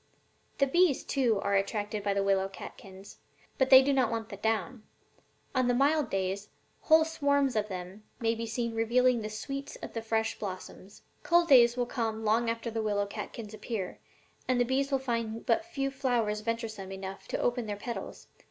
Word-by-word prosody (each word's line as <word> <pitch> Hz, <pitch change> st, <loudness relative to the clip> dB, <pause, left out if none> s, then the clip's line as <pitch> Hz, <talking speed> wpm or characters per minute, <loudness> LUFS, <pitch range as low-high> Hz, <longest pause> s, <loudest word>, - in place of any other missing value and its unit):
The 275 Hz, -, +4 dB
bees, 335 Hz, +1 st, +3 dB
too, 240 Hz, -7 st, +1 dB
are 200 Hz, -, -1 dB
attracted 205 Hz, +1 st, -1 dB
by 200 Hz, 0 st, 0 dB
the 200 Hz, -, +1 dB
willow 195 Hz, -1 st, +2 dB
catkins, 195 Hz, 0 st, -11 dB, 0.4 s
but 265 Hz, -1 st, +3 dB
they 265 Hz, 0 st, +10 dB
do 280 Hz, +1 st, +2 dB
not 260 Hz, -4 st, +2 dB
want 225 Hz, -1 st, -3 dB
the -, -, -6 dB
down. 225 Hz, +3 st, -1 dB, 0.7 s
On 255 Hz, -1 st, +2 dB
mild 285 Hz, -1 st, +2 dB
days 195 Hz, +1 st, -2 dB, 0.3 s
whole 315 Hz, 0 st, +5 dB
swarms 285 Hz, -4 st, +1 dB
of 210 Hz, -1 st, +1 dB
them 185 Hz, +2 st, -7 dB, 0.2 s
may 225 Hz, -1 st, +1 dB
be 230 Hz, 0 st, -4 dB
seen 235 Hz, +1 st, -2 dB
reveling 240 Hz, +2 st, +3 dB
in -, -, -3 dB
the 215 Hz, -, -4 dB
sweets 275 Hz, +6 st, -5 dB
of -, -, -9 dB
the 230 Hz, -, -3 dB
fresh 220 Hz, 0 st, -1 dB
blossoms. 190 Hz, 0 st, -8 dB, 0.2 s
'Cold 345 Hz, -1 st, +3 dB
days 240 Hz, -3 st, +7 dB
will 245 Hz, -, +1 dB
come 225 Hz, -3 st, -3 dB
long 230 Hz, +2 st, +2 dB
after 230 Hz, 0 st, -3 dB
the 225 Hz, 0 st, -2 dB
willow 205 Hz, -1 st, 0 dB
catkins 210 Hz, +1 st, -7 dB
appear, 215 Hz, -3 st, -5 dB, 0.5 s
and 255 Hz, -1 st, +2 dB
the 245 Hz, -, +3 dB
bees 270 Hz, +2 st, 0 dB
will 270 Hz, -, +3 dB
find 230 Hz, -3 st, -3 dB
but 335 Hz, -, +2 dB
few 275 Hz, -5 st, -2 dB
flowers 240 Hz, -6 st, 0 dB
venturesome 220 Hz, -4 st, -4 dB
enough 190 Hz, 0 st, -7 dB
to -, -, -2 dB
open 245 Hz, -2 st, 0 dB
their 205 Hz, -, -2 dB
petals. 235 Hz, +3 st, -6 dB
230 Hz, 190 wpm, -30 LUFS, 210-260 Hz, 0.7 s, they